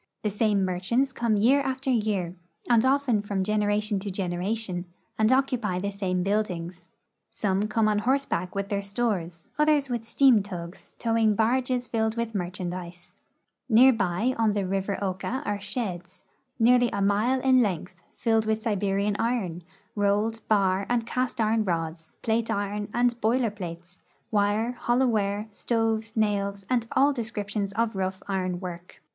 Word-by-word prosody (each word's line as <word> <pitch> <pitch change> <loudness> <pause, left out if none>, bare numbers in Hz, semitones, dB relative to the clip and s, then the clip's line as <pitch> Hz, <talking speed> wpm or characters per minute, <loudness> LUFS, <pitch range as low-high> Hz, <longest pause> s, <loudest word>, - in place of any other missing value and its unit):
The 210 - 0
same 205 -2 +2
merchants 195 +9 0
come 235 -3 0
year 255 +7 +4
after 265 0 -1
year, 210 -7 0 0.3
and 235 -2 +4
often 260 -5 +2
from 200 -2 -2
gen 215 +2 0
eration 205 -1 0
to 200 - -4
generation, 185 +1 -2 0.3
and 220 +2 +4
occupy 255 -8 +1
the 200 +2 -2
same 185 -3 -1
buildings. 180 -3 -2 0.4
Some 200 0 0
come 215 0 +2
on 210 -1 +2
horseback 240 -7 0
with 200 0 -2
their 200 -1 -1
stores, 200 -6 -3
others 300 -2 +3
with 240 -2 -2
steam 245 -1 +4
tugs 175 -3 -8
towing 225 -2 +2
barges 245 +3 +1
filled 220 -1 -1
with 235 -1 -2
merchandise. 180 -1 -5 0.6
Near 255 +3 +7
by 220 +3 0
on 220 -2 +3
the 205 -1 0
rivpr 195 +1 -2
Oka 200 +8 -2
are 205 -1 -2
sheds, 200 -4 -5 0.3
nearly 245 +1 +4
a - - -2
mile 210 +6 +2
in 255 -1 +4
length, 185 -5 -1 0.2
filled 225 -2 +1
with 220 0 +1
Siberian 200 -2 0
iron, 225 -8 -1 0.3
rolled, 205 +2 +1
bar, 195 -2 +2
and 240 -2 +1
cast 250 +1 -2
iron 220 0 +2
rods, 165 -3 -3
plate 225 0 0
iron, 205 +1 -2
and 240 0 +1
boiler 230 0 +2
plates, 175 -2 -9 0.3
wire, 210 +2 +1
hollow 245 +1 +1
ware, 210 -3 0
stoves, 225 +1 -1
nails, 200 -2 0
and 235 -3 +1
all 285 +2 +4
descriptions 210 -4 -3
of 225 0 0
rough 190 0 -3
iron 185 -2 -1
work. 175 -1 -8
210 Hz, 155 wpm, -26 LUFS, 190-235 Hz, 0.6 s, Near